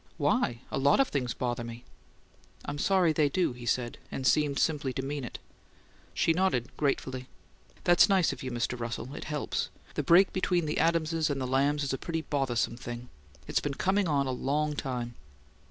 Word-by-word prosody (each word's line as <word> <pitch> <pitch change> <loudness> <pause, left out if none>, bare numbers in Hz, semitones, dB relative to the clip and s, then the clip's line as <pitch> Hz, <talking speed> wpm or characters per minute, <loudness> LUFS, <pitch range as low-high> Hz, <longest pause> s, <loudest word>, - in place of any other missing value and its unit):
"Why? 120 0 +1
A - - -1
lot 140 - +4
of 270 - +4
things 125 -4 -1
bother 120 -1 -2
me." 115 +1 -8 0.8
"I'm 145 0 -4
sorry 185 -2 +3
they 150 -1 +3
do," 175 -2 +1
he 120 -1 -9
said, 120 0 -1
and 130 - -4
seemed 145 0 +3
simply 145 -5 0
to 130 - -3
mean 145 0 -3
it. 120 - -6 0.8
She 165 - +3
nodded 160 -9 0
gratefully. 130 -3 -1 0.6
"That's 175 +4 +6
nice 190 -4 +3
of - - -9
you, 130 - -4
Mr. 120 0 -2
Russell. 120 +3 -4
It - - -7
helps. 150 -1 -2 0.2
The - - -1
break 185 +3 +5
between 180 -2 +1
the 150 - -1
Adamses 165 -1 +2
and 140 -1 -1
the 130 - -2
Lambs 140 +3 +2
is 135 - -1
a 135 - -2
pretty 165 -1 -3
bothersome 130 -6 0
thing. 120 0 -7 0.4
It's - - 0
been 145 -1 -3
coming 190 +3 +1
on 140 -3 +2
a 130 - -1
long 145 +4 0
time." 125 -4 -3
140 Hz, 190 wpm, -29 LUFS, 125-160 Hz, 0.8 s, That's